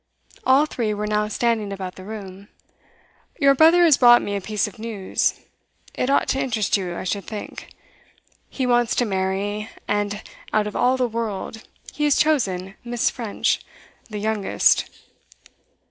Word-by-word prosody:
All 270 +3 +5
three 225 -8 -2
were 210 +1 -3
now 210 0 0
standing 220 -1 0
about 190 -2 -5
the 185 - -12
room. 200 -1 -9 0.9
'Your 275 -2 +5
brother 325 +5 +6
has 320 -5 +5
brought 240 -1 +7
me 205 - -3
a 200 - -2
piece 210 +1 -1
of 210 - -12
news. 215 -4 -1 0.5
It 250 - -1
ought 280 - +2
to 270 - +1
interest 235 -6 0
you, 180 -4 -2
I - - -5
should 200 +2 -3
think. 215 -2 -8 0.8
He 260 - -2
wants 240 -1 +2
to 245 - +2
marry, 200 +2 -2 0.2
and 205 0 -1 0.3
out 215 -1 +2
of 210 - -6
all 255 +1 +2
the 250 -1 +1
world, 220 -1 -4 0.3
he 295 - -1
has 290 - +4
chosen 195 -12 +1
Miss. 240 -1 0
French 230 -4 -1 0.5
the 210 - -5
youngest. 210 -1 +2
215 Hz, 160 wpm, -22 LUFS, 200-245 Hz, 0.9 s, brought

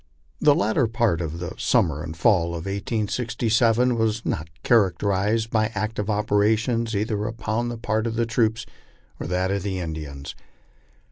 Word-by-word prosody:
The 145 - +5
latter 110 +3 +2
part 110 -6 +1
of 80 -1 -4
the 85 0 -5
summer 75 -3 +2
and 80 -1 -7
fall 85 -2 +2
of 85 - -6
1867 115 +3 +1
was 110 0 0
not 75 +1 -2
characterized 105 +1 +2
by 110 -2 +2
active 105 0 -2
operations 110 +2 +1
either 105 0 -1
upon 115 +1 -2
the 120 - -5
part 110 0 -1
of 115 - -3
the 115 0 +1
troops 110 -1 0 0.5
or - - -4
that 90 +2 0
of 100 0 0
the 95 0 -3
Indians. 75 -5 -6
110 Hz, 150 wpm, -24 LUFS, 95-115 Hz, 0.5 s, The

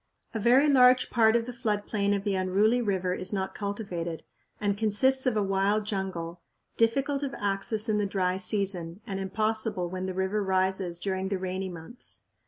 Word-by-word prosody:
A 225 - -2
very 250 +7 +5
large 255 -2 +5
part 225 -2 +4
of 235 -1 +2
the 250 - -6
flood 215 -4 -1
plain 200 -2 0
of 200 - -3
the 200 -1 0
unruly 195 +6 +2
river 190 -4 0
is 185 - -2
not 190 -2 -2
cultivated, 190 -5 -4 0.4
and 205 -1 0
consists 260 +6 +2
of 235 -4 +2
a 210 - +2
wild 195 +2 +1
jungle, 180 -4 -4 0.3
difficult 275 +5 +1
of 275 -1 -3
access 205 +2 -1
in 210 -1 +1
the 205 - 0
dry 185 -2 0
season 190 -2 -1
and 195 -4 -4
impossible 210 -2 -1
when 185 0 -3
the 185 - -4
river 190 +3 0
rises 190 -2 0
during 190 +1 -2
the 195 - 0
rainy 185 +1 -3
months. 175 +8 -8
200 Hz, 185 wpm, -28 LUFS, 190-220 Hz, 0.4 s, very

